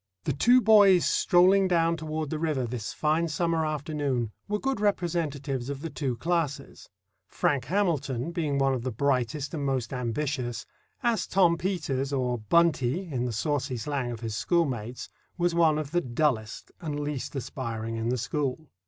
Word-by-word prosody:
The - - 0
two 245 - +5
boys 205 -5 +6
strolling 185 +2 +4
down 170 -2 +2
toward 155 -2 -4
the 155 - -2
river 150 -6 0
this 115 -2 -4
fine 155 +2 +1
summer 165 +1 0
afternoon 145 -6 -2 0.2
were 210 +1 0
good 270 0 -2
representatives 155 -9 -1
of 140 -1 -5
the 165 0 -5
two 135 -5 -2
classes—Frank 145 -2 -3
Hamilton 165 -8 0
being 155 -5 -1
one 135 -1 +2
of 130 - -2
the 130 - -2
brightest 140 +4 -1
and 150 -3 -3
most 135 -3 -1
ambitious, 125 -1 -2 0.4
as 230 -5 +1
Tom 180 -3 +4
Peters, 150 -7 -2
or 125 -3 0
"Buntie" 165 - +2
in 125 -1 -1
the 125 - -2
saucy 135 +2 -1
slang 130 +1 -2
of 115 - -7
his 110 -2 -4
schoolmates, 125 -8 -1 0.3
was 175 -1 +1
one 165 -3 +4
of 150 -2 -4
the 175 +1 +2
dullest 120 -4 -1
and 150 -3 -3
least 145 -2 -4
aspiring 115 -4 -4
in 115 +1 -1
the 125 - 0
school. 140 +4 -3
145 Hz, 160 wpm, -27 LUFS, 125-170 Hz, 0.4 s, boys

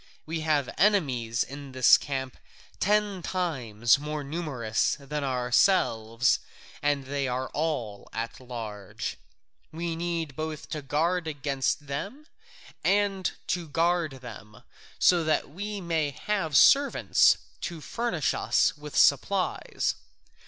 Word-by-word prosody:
We 160 +1 -3
have 155 -4 +1
enemies 130 - +2
in 140 0 -9
this 130 -1 +7
camp 130 -2 -3 0.4
ten 205 -1 +1
times 130 - +1
more 150 0 -4
numerous 135 - -1
than 145 +1 -4
ourselves, 125 - +2 0.4
and 145 -2 0
they 140 0 -2
are 130 +1 -2
all 125 -10 -3
at 115 +1 -4
large: 110 -6 -6 0.5
we 165 +1 -3
need 165 -4 -3
both 155 0 -5
to 155 - -3
guard 165 +5 0
against 145 0 -1
them 200 - -5 0.6
and 195 -2 +2
to 175 -2 -2
guard 165 -3 0
them, 105 -3 -11 0.3
so 175 -2 +4
that 155 -3 0
we 205 +5 -5
may 165 -4 0
have 160 0 -1
servants 280 0 +5 0.2
to 170 -2 -4
furnish 165 - -1
us - - +2
with 150 -1 -7
supplies. 185 +7 +2
150 Hz, 115 wpm, -27 LUFS, 130-170 Hz, 0.6 s, this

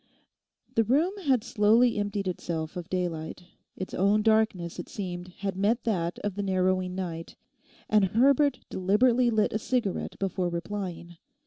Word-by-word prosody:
The 225 - +3
room 300 - +2
had 260 -5 +3
slowly 230 0 +3
emptied 205 -1 -2
itself 170 -2 -3
of 175 -1 -6
daylight; 175 -2 -3 0.3
its 185 - -6
own 205 +3 +2
darkness, 215 -6 +1
it - - -7
seemed, 180 -3 -5
had 190 +1 -5
met 210 +5 +1
that 175 -6 -1
of 205 -1 -1
the 205 - -3
narrowing 185 -1 0
night, 170 -3 -5 0.5
and 210 -2 +4
Herbert 265 +6 +3
deliberately 235 +6 +3
lit 215 -2 +1
a 215 - 0
cigarette 225 -4 -2
before 185 -2 -1
replying. 175 -1 -5
200 Hz, 145 wpm, -28 LUFS, 180-220 Hz, 0.5 s, and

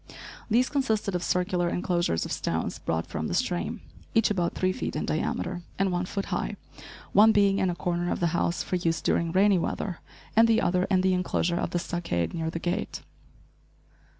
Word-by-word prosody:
These 245 +4 +3
consisted 220 -8 0
of 180 - -1
circular 180 0 0
enclosures 175 - 0
of - - -6
stones - - -2
brought 80 0 -1
from - - -4
the - - -2
stream, - - -1 0.3
each 225 -1 +4
about 175 -4 0
three 185 0 +1
feet - - -4
in 150 - -1
diameter 175 +3 -2 0.2
and 195 -1 +1
one 180 0 0
foot 200 +1 -3
high, - - -2 0.6
one 220 +2 +7
being 200 -2 +3
in 190 - +2
a 175 - -2
corner 175 0 -1
of - - -1
the 170 -1 +1
house 170 0 0
for 185 - -1
use 165 -2 0
during 170 -1 +1
rainy 195 +1 +4
weather, 180 +1 -3 0.4
and 225 +1 +7
the 225 0 +4
other 180 -1 +2
in 190 -2 +2
the 190 0 +3
enclosure 180 -1 0
of - - -1
the - - -1
stockade, 170 - -2
near 165 -1 -2
the 165 - -4
gate. 175 +4 -3
180 Hz, 195 wpm, -27 LUFS, 170-195 Hz, 0.6 s, one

